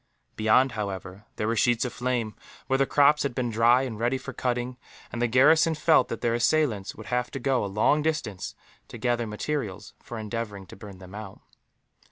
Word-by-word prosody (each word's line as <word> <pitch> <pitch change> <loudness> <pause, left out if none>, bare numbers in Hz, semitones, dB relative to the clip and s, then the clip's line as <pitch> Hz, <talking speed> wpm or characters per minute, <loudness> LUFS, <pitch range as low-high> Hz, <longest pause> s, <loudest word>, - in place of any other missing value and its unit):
Beyond, 110 +5 +3
however, 100 -2 -5
there 105 - -2
were 115 - +1
sheets 120 +2 +2
of 125 - -4
flame, 120 -4 -2 0.3
where 135 0 +1
the 135 - +3
crops 145 +1 +4
had 140 -4 -2
been 125 -2 -1
dry 120 +3 +4
and 115 -5 -5
ready 120 +3 +1
for 135 +1 -8
cutting; 125 0 -2 0.3
and 120 - -4
the 120 - +3
garrison 160 +7 +5
felt 155 -3 +4
that 115 - -5
their 115 - +1
assailants 120 -5 +1
would 110 - -10
have 125 0 0
to 135 - -6
go 135 -2 +1
a - - -2
long 110 +9 +2
distance, 150 - -3 0.3
to - - -9
gather 120 -2 0
materials 105 -3 -4
for 120 - -8
endeavouring 110 -2 -5
to 85 - -12
burn 100 -1 -11
them 95 0 -13
out. 105 -2 -8
120 Hz, 200 wpm, -26 LUFS, 105-130 Hz, 0.3 s, garrison